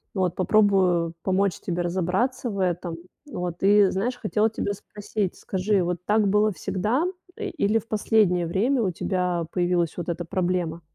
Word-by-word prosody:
Вот. 180 -3 +1
Попробую 185 -4 +3
помочь 190 0 +1
тебе 175 -1 -2
разобраться 190 +9 -1
в 200 - -5
этом. 175 -2 -1 0.3
Вот. 175 -1 -4
И 200 0 +5
знаешь, 235 +7 -1
хотела 215 0 +1
тебя 200 -1 -2
спросить: 205 -1 -4
скажи, 190 0 0
вот 175 0 -1
так 210 -1 +3
было 210 +2 +3
всегда, 205 - -1 0.3
э, 425 -3 -4
или 210 - +1
в 225 - -5
последнее 205 -5 +2
время 235 +9 +1
у 190 -4 +1
тебя 180 -1 -1
появилась 175 -2 0
вот 175 0 -4
эта 170 0 -3
проблема? 175 -2 -1
190 Hz, 160 wpm, -25 LUFS, 175-210 Hz, 0.3 s, И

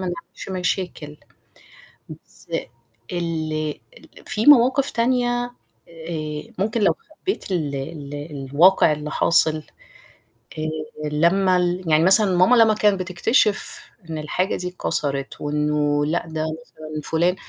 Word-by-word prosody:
نعملش 170 +2 -10
مشاكل، 180 -5 -3 0.9
بس - - -14 0.7
ال 155 -3 -2 0.5
في 215 +1 -2
مواقف 265 0 +5
تانية، 245 0 0 0.6
آآ 155 +7 -5
ممكن 215 +3 -1
لو 200 - +3 0.3
خبيت 380 - -3
ال 150 -6 -2
ال 140 +1 -7 0.4
الواقع 170 +2 +5
اللي 150 0 -4
حاصل، 155 -2 +4 1.0
آآ 155 - -2 0.4
لما 180 +4 +3
ال 180 +1 -1
يعني 155 +1 +4
مثلًا 190 +1 +6
ماما 185 +8 +5
لما 225 -2 +5
كانت 210 -2 +2
بتكتشف 200 +4 0 0.3
إن 160 - -4
الحاجة 165 +5 -1
دي 180 - -4
اتكسرت 140 -6 -3
وإنه 150 0 0
لأ، 165 +4 -1
ده 160 -1 -3 0.2
مثلًا 155 -1 -9
فلان 170 +4 +1
170 Hz, 115 wpm, -22 LUFS, 155-195 Hz, 1.0 s, مثلًا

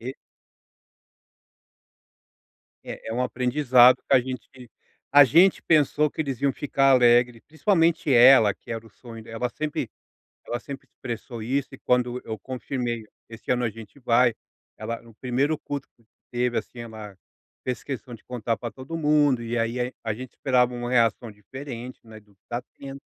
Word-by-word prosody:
e 130 +4 -6 2.7
É - - -8
é - - -3
um 125 - 0
aprendizado, 125 0 +4
que - - +2
a - - +6
gente 125 0 -8 0.4
a 145 0 +9
gente 170 +8 +5
pensou 150 -1 +3
que - - -15
eles 135 -3 -4
iam 140 -1 +3
ficar 135 -1 +1
alegre, 120 -1 +4
principalmente 165 -2 +1
ela, 120 -3 +7
que - - -12
era 115 0 -5
o - - -15
sonho 115 +1 -12
de - - -15
ela 120 +2 -2
sempre 150 +4 -4 0.6
ela 120 - -3
sempre 140 +1 -9
expressou 120 -1 -7
isso 135 +4 -1
e 130 - -10
quando 125 0 0
eu 110 -1 -5
confirmei: 120 -1 -4 0.2
"Esse 115 +2 -6
ano 125 0 +1
a 115 - +1
gente 110 +3 -13
vai". 120 -1 +3 0.4
Ela 115 0 -5
no 115 -1 -17
primeiro 135 +6 0
culto 140 -2 -6
que 115 - -30 0.3
teve, 120 0 0
assim, 120 - -6
ela 110 -3 -9 0.5
fez 125 -3 -4
questão 130 -2 -6
de 110 - -12
contar 120 -2 -2
pra 120 - -5
todo 135 +5 -7
mundo 150 -5 +3
e 115 +1 -3
aí 115 +2 -1
aí 125 +1 -2
a 110 -2 -1
gente 130 +2 -9
esperava 125 -2 +1
uma 120 0 -4
reação 115 -2 +1
diferente, 125 +4 -9
né, 110 -1 -13
do 105 -2 -26
que - - -53
tá 120 +1 -3 0.2
tendo. 135 0 -9
125 Hz, 175 wpm, -25 LUFS, 115-135 Hz, 2.7 s, a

